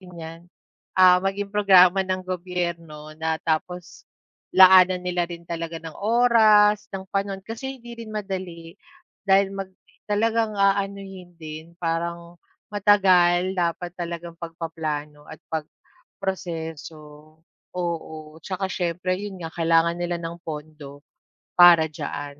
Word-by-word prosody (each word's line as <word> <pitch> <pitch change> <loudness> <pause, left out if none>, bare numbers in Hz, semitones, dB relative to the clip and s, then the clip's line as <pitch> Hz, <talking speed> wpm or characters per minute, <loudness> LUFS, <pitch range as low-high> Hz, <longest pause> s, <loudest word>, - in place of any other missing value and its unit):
rin 180 -1 -14
'yan, 165 0 -9 0.6
ah, 180 -1 +6
maging 195 +1 -3
programa 195 -2 +6
ng 185 -1 -2
gobyerno 170 -4 -5
na 160 0 0
tapos 170 +2 -4 0.5
laanan 185 -1 +7
nila 175 -1 -1
rin 170 -1 -9
talaga 165 0 -5
ng 165 -1 -9
oras, 215 -2 +4
ng 190 -1 -5
panahon 195 -1 -2
kasi 265 +5 -6
hindi 240 -1 -12
rin 230 - -8
madali 185 -5 -6 0.6
dahil 195 0 +4
mag 195 -1 -5 0.4
talagang 220 +1 0
aanuhin 195 -2 -1
din. 160 +1 -10
Parang 170 0 -4 0.3
matagal, 185 -3 +4
dapat 175 -1 -2
talagang 170 -1 -6
pagpaplano 155 -3 -6
at 155 - -11
pagproseso. 160 -2 -7 0.4
Oo, 160 -3 -5
tsaka 190 +4 -4
siyempre, 180 +1 -2
'yon 205 -2 -6
nga, 165 - -6
kailangan 165 0 +2
nila 175 0 -2
ng 170 +1 -7
pondo 150 -3 -9 0.6
para 170 -3 +7
diyan. 145 -1 -6
175 Hz, 120 wpm, -23 LUFS, 165-195 Hz, 0.6 s, laanan